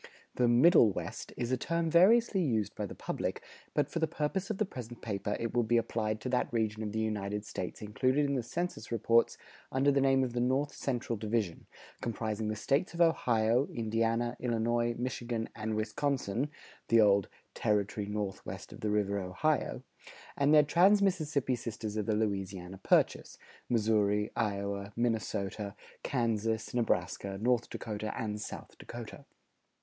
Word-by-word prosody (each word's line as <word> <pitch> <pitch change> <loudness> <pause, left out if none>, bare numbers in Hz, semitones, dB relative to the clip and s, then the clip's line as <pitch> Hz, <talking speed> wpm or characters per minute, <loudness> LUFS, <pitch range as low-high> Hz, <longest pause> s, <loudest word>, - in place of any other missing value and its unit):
The 125 - +2
"Middle 120 - +6
West" 90 +4 -6
is 120 +1 -2
a 130 - +2
term 170 +4 -1
variously 195 +4 +5
used 110 - 0
by - - -4
the - - -9
public, - - -3 0.3
but 145 -2 +2
for 165 - -3
the 160 - +2
purpose 160 +5 -2
of 215 - -2
the 215 - +1
present 120 - -9
paper, 105 -1 -2
it 115 - -3
will 120 - +3
be 120 +1 +2
applied 110 -2 -1
to 130 - -3
that 125 0 0
region 110 -2 -1
of 105 -1 -3
the 110 - -4
United 105 -1 -2
States 95 0 -5
included 130 +7 +1
in 140 - 0
the 130 - +1
census 140 -1 -4
reports 115 +1 +3 0.3
under 135 +2 +3
the 140 0 +2
name 135 0 +4
of 125 -2 -2
the 120 - -1
North 130 +4 +1
Central 120 -3 -2
division, 105 -5 -2 0.3
comprising 110 -1 -2
the 110 - -1
States 140 - 0
of 170 - -1
Ohio, 120 -6 +3
Indiana, 115 +1 0
Illinois, 120 0 0
Michigan, 120 -2 -3
and 110 0 -3
Wisconsin 120 +3 -1 0.4
(the 115 - +5
old 100 -2 +5 0.3
"Territory 105 0 0
Northwest 105 -2 -5
of - - -11
the 110 - -1
River 100 -1 +1
Ohio"), 100 +11 -1 0.5
and 140 +1 +3
their 150 -1 +8
trans 190 +7 +5
Mississippi 150 -9 +1
sisters 110 -3 -5
of 105 -2 -2
the 110 - +2
Louisiana 95 -3 -2
Purchase, - - +2 0.3
Missouri, 105 -2 +2
Iowa, 100 -2 -2
Minnesota, 105 -3 -2 0.3
Kansas, 115 -3 -1
Nebraska, 105 -4 -1
North 120 +1 +1
Dakota, 110 -1 -4
and 105 -2 -3
South - - -8
Dakota. - - -9
115 Hz, 160 wpm, -31 LUFS, 105-130 Hz, 0.5 s, their